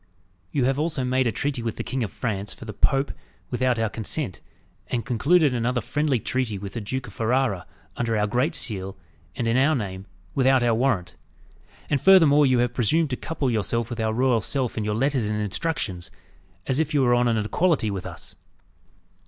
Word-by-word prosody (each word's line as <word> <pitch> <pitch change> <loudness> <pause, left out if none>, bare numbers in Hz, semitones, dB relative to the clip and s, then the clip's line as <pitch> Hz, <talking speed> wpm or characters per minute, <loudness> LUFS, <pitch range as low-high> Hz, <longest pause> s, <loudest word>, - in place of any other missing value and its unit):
You 135 -4 +1
have 135 +2 +1
also 155 -4 -1
made 130 0 +1
a - - +1
treaty 135 +1 -2
with 115 -1 -3
the - - -4
King 130 - -3
of 110 - -1
France 100 -4 -3
for - - -11
the 110 - -6
Pope 135 0 +1 0.4
without 125 0 +1
our 115 0 +1
consent, 110 - -2 0.5
and 120 -3 -2
concluded 145 - +3
another 125 +1 0
friendly 145 0 0
treaty 120 -3 -2
with 100 0 -7
the 115 - -4
Duke 125 +5 -4
of 105 - -11
Ferrara, 115 -5 0 0.3
under 115 -2 -1
our 105 - +2
great 125 +8 0
seal, 95 -4 -1 0.4
and 115 - -2
in 115 +2 +2
our 145 +4 +4
name, 95 -4 -5 0.3
without 130 -1 +3
our 120 -1 +3
warrant. 110 -7 0 0.7
And 140 - 0
furthermore 155 -7 +6
you 130 -1 +3
have 120 0 +1
presumed 140 +6 +2
to - - 0
couple 140 -2 -2
yourself 115 +2 -1
with 120 - -5
our 110 0 +1
royal 120 0 +2
self 130 +3 0
in 110 - -2
your 105 0 -1
letters 130 -2 +1
and 105 0 -1
instructions, 100 - -2 0.6
as 130 +2 0
if 155 -1 0
you 140 - +4
were 120 -1 +4
on 120 0 +3
an 115 -1 +2
equality 110 - +1
with 95 -2 -5
us." - - -8
120 Hz, 200 wpm, -24 LUFS, 110-135 Hz, 0.7 s, furthermore